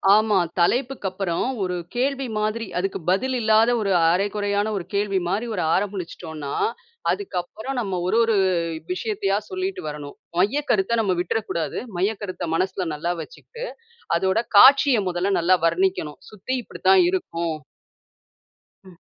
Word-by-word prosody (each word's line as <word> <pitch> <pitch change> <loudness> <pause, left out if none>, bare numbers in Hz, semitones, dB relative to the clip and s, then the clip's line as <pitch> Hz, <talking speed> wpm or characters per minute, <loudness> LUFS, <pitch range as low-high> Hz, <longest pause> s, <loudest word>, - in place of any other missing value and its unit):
ஆமா. 215 -1 +3 0.2
தலைப்புக்கு 245 +3 +1
அப்பறம், 185 +1 -2 0.2
ஒரு 180 -1 -2 0.2
கேள்வி 270 +1 0
மாதிரி, 215 +2 -1
அதுக்கு 190 +1 -1
பதில் 255 +8 +1
இல்லாத, 220 +1 +4
ஒரு 200 - 0 0.2
அரைகுறையான 205 +2 0
ஒரு 175 - -5
கேள்வி 200 -1 +1
மாரி, 205 +6 -1
ஒரு 180 - -1
ஆரம்பிச்சுட்டோம்ன்னா, 170 -7 -3 0.6
அதுக்கப்புறம் 220 - -4
நம்ம, 190 -4 -2
ஒரு 220 - +2
ஒரு 225 -2 +2 0.6
விஷயத்தையா 370 - -1
சொல்லிட்டு 375 +1 -3
வரணும். 145 -1 -8 0.2
மையக்கருத்த 225 0 +1
நம்ம 190 -4 +1
விட்டுற 180 +5 0
கூடாது. 165 -2 -2 0.2
மையக்கருத்த 190 -2 -2
மனசுல 185 +1 -1
நல்லா 170 +4 -1
வச்சுக்கிட்டு, 485 +1 -9 0.5
அதோட 190 +4 +1 0.2
காட்சிய 270 +1 +7
முதல்ல 185 +3 0
நல்லா 180 +2 +4
வர்ணிக்கணும். 170 -3 0
"சுத்தி 215 +5 -4
இப்படி - - -12
தான் 380 -1 +7
இருக்கும்" 170 - -2 1.3
ம். 185 -2 -15
200 Hz, 130 wpm, -23 LUFS, 180-235 Hz, 1.3 s, காட்சிய